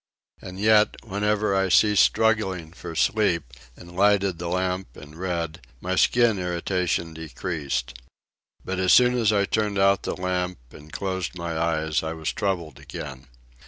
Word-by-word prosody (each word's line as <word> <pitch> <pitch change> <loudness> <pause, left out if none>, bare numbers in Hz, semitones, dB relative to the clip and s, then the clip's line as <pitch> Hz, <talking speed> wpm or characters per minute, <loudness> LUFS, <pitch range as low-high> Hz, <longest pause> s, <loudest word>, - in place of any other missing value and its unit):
And 95 0 -9
yet, 110 0 +4
whenever 105 0 0
I 95 0 +1
ceased 105 +2 +5
struggling 95 -7 +1
for 85 -2 -8
sleep, 85 - +1 0.2
and 85 0 -13
lighted 100 -2 +2
the 85 - -4
lamp 90 -3 -2
and 75 +2 -12
read, 85 -2 -3 0.2
my 90 +5 -2
skin 115 +1 +3
irritation 90 -1 -1
decreased. 80 -5 -4 0.7
But 95 0 -3
as 95 -1 +3
soon 125 0 +6
as 115 -4 +2
I 100 -2 +2
turned 105 -1 -1
out 100 0 +4
the - - -3
lamp 90 -1 -2
and 75 +1 -14
closed 95 -1 -3
my 85 -1 -4
eyes 80 -1 0
I 80 0 -4
was 80 -1 -3
troubled 90 -6 -3
again. 65 -3 -8
90 Hz, 155 wpm, -24 LUFS, 85-100 Hz, 0.7 s, soon